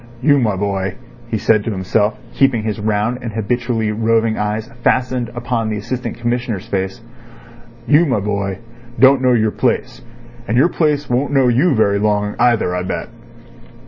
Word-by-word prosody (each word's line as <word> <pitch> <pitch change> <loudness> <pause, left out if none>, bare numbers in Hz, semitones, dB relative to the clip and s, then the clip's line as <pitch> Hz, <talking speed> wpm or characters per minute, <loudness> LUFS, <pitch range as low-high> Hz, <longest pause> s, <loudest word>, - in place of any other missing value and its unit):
"You, 145 0 +5
my 110 -5 +1
boy," 95 -1 -2 0.3
he - - -1
said 110 -2 +2
to - - -3
himself, 105 +2 0 0.2
keeping 135 -5 +2
his 110 -1 -3
round 110 +3 -1
and 115 -3 -5
habitually 115 0 -1
roving 115 0 +1
eyes 105 +1 -2 0.2
fastened 125 -2 +1
upon 120 -2 -2
the 105 - -2
Assistant 125 +4 -4
Commissioner's 120 -4 -2
face—"you, 115 - -3
my 125 -6 +1
boy, 100 -1 -2
you 115 +2 -21
don't 135 0 +6
know 130 -1 +3
your 110 -2 +2
place, - - -1 0.5
and 115 - 0
your 150 +7 +5
place 150 -4 0
won't 125 +4 0
know 135 -3 +4
you 135 +6 +3
very 100 -2 +2
long 105 0 0
either, 115 -7 +2
I 90 - -1
bet." 95 - -4
115 Hz, 165 wpm, -18 LUFS, 105-125 Hz, 0.5 s, don't